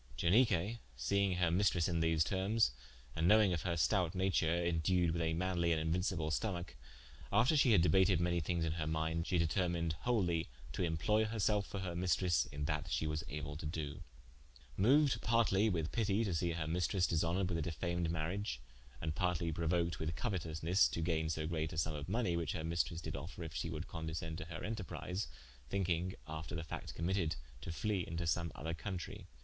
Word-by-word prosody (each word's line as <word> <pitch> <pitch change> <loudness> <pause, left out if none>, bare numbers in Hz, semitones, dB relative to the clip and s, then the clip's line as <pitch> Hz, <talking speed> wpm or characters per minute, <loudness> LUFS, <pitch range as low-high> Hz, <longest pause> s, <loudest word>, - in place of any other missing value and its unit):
Ianique 105 +2 +3 0.2
seing 100 +8 +1
her 90 -2 +2
maistresse 90 -2 +3
in 85 -2 0
these 80 -1 +3
termes, 95 - +2 0.4
and 80 +1 +2
knowinge 105 -5 +5
her 85 +1 -1
stoute 90 +3 +2
nature, 95 -3 +2
indued 85 +1 +2
with 85 +1 -1
a 80 0 0
manly 85 -1 +1
and 80 - +2
inuincible 80 0 0
stomacke, 85 +1 -2 0.6
after 115 +10 +4
shee 135 -5 +5
had 85 -5 +6
debated 90 -1 +4
manye 85 0 +1
thinges 85 +1 0
in 80 - 0
her 80 -1 -2
minde, 80 +1 -1
she 90 - +2
determined 85 -1 +1
wholie 90 -9 +1 0.3
to 75 - -3
imploye 90 +6 +2
herselfe 105 -2 +1
for 100 - -5
her 90 -2 -3
maistres 90 -4 +2
in 70 0 -3
that 75 -1 -2
shee - - 0
was 75 -1 -2
able 75 +1 -5
to 75 0 -5
doe. 75 -2 -4 0.7
Moued 140 +7 +4
partly 110 -2 +3
with 80 -4 -1
pitie 105 -1 +1
to 95 - -1
see 85 +1 0
her 80 -1 -2
maistres 90 +3 +1
dishonored 85 +3 +1
with 85 -2 -1
a - - 0
defamed 85 +1 -2
mariage, 85 - -2 0.4
and 80 -1 -1
partly 85 0 0
prouoked 85 0 0
with 80 +1 -2
couetousnes 85 +1 +1
to 85 - -3
gaine 80 -2 0
so 80 0 -1
great 80 -1 -2
a - - -6
summe 80 +1 +1
of 75 +1 -6
money, 100 -4 +1
which 85 -4 -1
her 80 - -3
maistres 85 0 -1
did - - -4
offer 85 +1 -6
if 80 -2 -7
she 65 +6 -2
would 80 +1 -4
condiscende 80 -1 -4
to 90 - -5
her 85 - -7
enterprise 100 -3 -4 0.4
(thinking 90 -1 0
after 80 +1 -5
the 80 - -3
facte 80 - -7
committed, 85 -1 0 0.3
to 85 - -5
flee 100 +2 -1
into 85 +1 -3
some 85 0 0
other 80 +2 -4
countrie.) 90 0 -6
85 Hz, 190 wpm, -36 LUFS, 80-95 Hz, 0.7 s, had